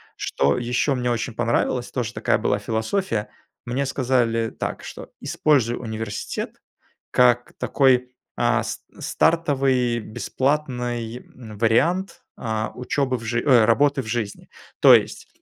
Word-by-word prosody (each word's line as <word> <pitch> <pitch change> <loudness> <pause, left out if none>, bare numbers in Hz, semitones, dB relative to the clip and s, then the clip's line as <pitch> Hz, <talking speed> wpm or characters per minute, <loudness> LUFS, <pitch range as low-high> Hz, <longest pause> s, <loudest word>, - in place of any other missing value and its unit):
что 70 +1 0
еще 125 +3 0
мне 125 -1 -1
очень 120 +1 -2
понравилось, 120 +1 0
тоже 125 -4 -3
такая - - +1
была - - +1
философия, 110 - -2 0.4
мне 130 +3 -1
сказали 120 -4 +1
так - - -5
что: - - -9
"Используй 130 -6 +2
университет 110 -2 -5 0.5
как 120 -1 +3
такой, 125 -2 +2 0.2
а, 120 -1 +2
с 110 -1 -6 0.2
стартовый 135 -7 +1
бесплатный, 125 -1 -2
м, 115 -4 -12
вариант, 170 - +1
э, 110 -1 -2
учебы 130 +1 -1
в 115 - -10
жи 115 +1 -1
ой, 125 -6 +6
работы 140 +4 +3
в - - -11
жизни". 110 -2 -4 0.3
То - - +9
есть, - - -1
120 Hz, 130 wpm, -23 LUFS, 115-130 Hz, 0.5 s, То